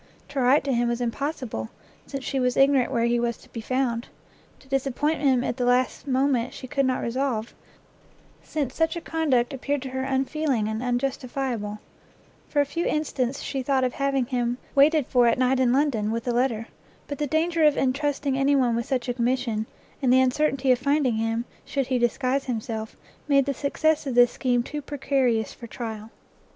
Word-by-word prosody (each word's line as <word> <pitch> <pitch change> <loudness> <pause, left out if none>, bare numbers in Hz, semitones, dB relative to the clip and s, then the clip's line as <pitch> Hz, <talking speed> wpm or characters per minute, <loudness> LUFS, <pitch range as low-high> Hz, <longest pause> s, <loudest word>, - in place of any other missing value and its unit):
To 285 - -3
write 260 +3 +4
to 275 -1 0
him 240 0 +1
was 235 0 -1
impossible, 245 - -3 0.4
since 275 -2 -5
she 270 - -2
was 250 -1 +1
ignorant 270 -2 +4
where 235 -3 +1
he 240 0 +2
was 235 -1 -1
to - - -19
be 230 - -6
found; 245 -1 -1 0.5
to - - -21
disappoint 275 +3 0
him 260 -4 +3
at 245 - -2
the 250 - -1
last 250 +3 +1
moment 260 -2 +1
she - - -8
could 275 +1 0
not 255 -1 0
resolve, 240 -2 -2 0.9
since 285 -5 -3
such 325 +1 +1
a - - -2
conduct 280 -8 0
appeared 280 +1 -2
to 265 - -5
her 260 0 -3
unfeeling 265 -2 0
and 220 +1 -3
unjustifiable; 250 -3 -2 0.7
for 290 - +2
a - - +1
few 335 +5 -2
instants 280 -4 -1
she 275 -1 -3
thought 265 0 +1
of 250 - 0
having 275 -2 0
him 245 -1 -1 0.2
waited 295 +1 +5
for 245 -1 +3
at 230 - +3
night 255 +1 +2
in 250 -2 +3
London, 255 -6 +1
with 230 +2 -3
a 245 - +1
letter; 235 -2 0 0.4
but 285 - -5
the 295 - 0
danger 325 +3 +1
of 300 -1 +5
entrusting 275 +1 0
any 275 +1 +3
one 250 -4 +2
with 235 0 -2
such 260 -3 -1
a 245 - 0
commission, 240 -3 -1 0.3
and 255 -3 +3
the 260 - +6
uncertainty 260 0 +2
of 250 - +3
finding 275 -3 +1
him, 225 +1 -1 0.2
should 275 -2 -2
he 255 0 0
disguise 255 +3 0
himself, 220 -2 -4 0.3
made 275 -2 +4
the 280 - -1
success 295 +2 0
of 260 - -2
this 245 0 +6
scheme 245 -2 0
too 295 +3 -5
precarious 265 -6 0
for 235 - -10
trial. 220 -2 -6
260 Hz, 195 wpm, -25 LUFS, 240-280 Hz, 0.9 s, the